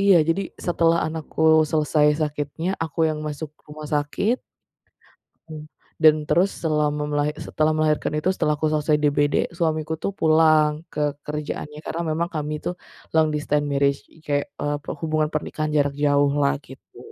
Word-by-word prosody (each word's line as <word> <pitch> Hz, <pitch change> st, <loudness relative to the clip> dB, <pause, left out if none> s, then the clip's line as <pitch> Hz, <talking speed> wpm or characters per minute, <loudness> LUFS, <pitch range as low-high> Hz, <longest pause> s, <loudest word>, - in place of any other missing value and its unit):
Iya, 200 Hz, -2 st, +6 dB
jadi, 195 Hz, +4 st, +1 dB, 0.2 s
setelah 170 Hz, -1 st, +3 dB
anakku 160 Hz, 0 st, -4 dB, 0.3 s
selesai 150 Hz, -1 st, +2 dB
sakitnya, 150 Hz, +3 st, -3 dB
aku 160 Hz, 0 st, -6 dB
yang 155 Hz, -1 st, -1 dB
masuk 150 Hz, 0 st, -5 dB, 0.2 s
rumah 150 Hz, 0 st, -9 dB
sakit. 150 Hz, +11 st, 0 dB, 1.7 s
Dan 155 Hz, -1 st, +5 dB
terus 185 Hz, +5 st, +3 dB
selama 150 Hz, -2 st, 0 dB
melahi 145 Hz, 0 st, 0 dB
setelah 155 Hz, 0 st, 0 dB
melahirkan 155 Hz, -1 st, +1 dB
itu, 170 Hz, -, -1 dB
setelah 150 Hz, -3 st, 0 dB
aku 155 Hz, -, 0 dB
selesai 150 Hz, 0 st, +2 dB
DBD, 145 Hz, 0 st, +1 dB
suamiku 160 Hz, -1 st, -1 dB
tuh -, -, 0 dB
pulang 155 Hz, -3 st, +3 dB
ke 150 Hz, -1 st, -1 dB
kerjaannya 150 Hz, 0 st, -5 dB
karena 170 Hz, -, -3 dB
memang 165 Hz, +2 st, -1 dB
kami 150 Hz, 0 st, -2 dB
itu 180 Hz, -, -4 dB, 0.4 s
long 160 Hz, -1 st, +4 dB
distance 150 Hz, 0 st, 0 dB
marriage, 140 Hz, 0 st, +1 dB, 0.3 s
kek, 145 Hz, -1 st, -1 dB
eee, 145 Hz, 0 st, -1 dB
perhubungan 155 Hz, 0 st, -2 dB
pernikahan 155 Hz, 0 st, -2 dB
jarak 145 Hz, -2 st, +1 dB
jauh 145 Hz, -1 st, +2 dB
lah, 140 Hz, 0 st, +2 dB
gitu. 135 Hz, -, -15 dB
150 Hz, 145 wpm, -23 LUFS, 150-160 Hz, 1.7 s, Iya